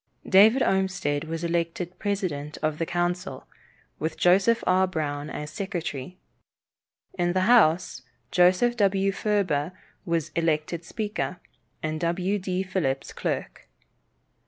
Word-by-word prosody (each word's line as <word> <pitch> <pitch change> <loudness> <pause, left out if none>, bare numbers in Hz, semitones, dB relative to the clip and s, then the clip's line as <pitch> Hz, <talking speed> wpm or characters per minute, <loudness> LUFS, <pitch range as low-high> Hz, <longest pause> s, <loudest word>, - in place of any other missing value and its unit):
David 215 +7 +6
Olmsted 180 -7 0
was 165 +1 -5
elected 170 +1 -2
president 180 -8 -3
of 155 0 0
the 165 - -1
council, 175 -4 -2 0.5
with 160 +1 -3
Joseph 195 +6 +4
R. 185 +1 +3
Brown 150 -4 -3
as 150 0 -6
secretary. 175 -4 -5 1.0
In 175 0 +1
the 185 - +1
House, 185 - +4 0.3
Joseph 185 +7 +4
W. 195 -2 +2
Furber 185 -7 0 0.3
was 170 -5 -1
elected 165 0 -1
speaker, 210 -1 -3 0.5
and 155 0 -2
W. 180 +4 0
D. 185 0 -2
Phillips 155 -8 -2
clerk. - - -4
180 Hz, 115 wpm, -26 LUFS, 155-190 Hz, 1.0 s, David